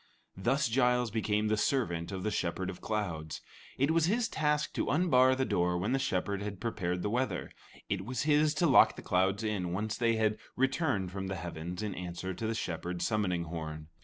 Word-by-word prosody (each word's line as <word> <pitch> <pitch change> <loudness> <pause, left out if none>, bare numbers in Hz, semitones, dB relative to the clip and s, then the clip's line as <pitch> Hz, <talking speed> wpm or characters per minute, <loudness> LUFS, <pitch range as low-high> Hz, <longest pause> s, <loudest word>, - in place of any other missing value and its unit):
Thus 125 +10 +1
Giles 125 -1 +2
became 105 -1 0
the 110 - +2
servant 90 -7 0
of 95 -1 -4
the 110 - 0
Shepherd 95 -1 -2
of 90 - -12
Clouds. 85 -8 -3 0.4
It 140 +4 +2
was 165 -1 +3
his 225 +4 +2
task 150 -1 0
to - - -1
unbar 130 -6 +4
the 130 0 0
door 90 -4 +1
when 100 +7 -1
the 135 - +2
Shepherd 100 -3 -1
had 100 -2 -5
prepared 90 -6 -2
the - - 0
weather; 125 +3 -1 0.4
it 95 -2 -2
was 125 +4 -2
his 150 0 +3
to 170 - +2
lock 145 - +6
the - - -9
clouds 95 +3 +1
in, 95 -5 -1
once 105 +3 -2
they 115 -1 +2
had 110 -1 +1 0.2
returned 130 - +1
from 95 0 -4
the 95 - -3
heavens 85 +2 -5
in 105 -2 -2
answer 90 +1 -5
to 110 +5 -4
the 115 - -1
Shepherd's 90 -3 -3
summoning 95 -6 0
horn. 80 -2 -6
105 Hz, 200 wpm, -31 LUFS, 90-125 Hz, 0.4 s, lock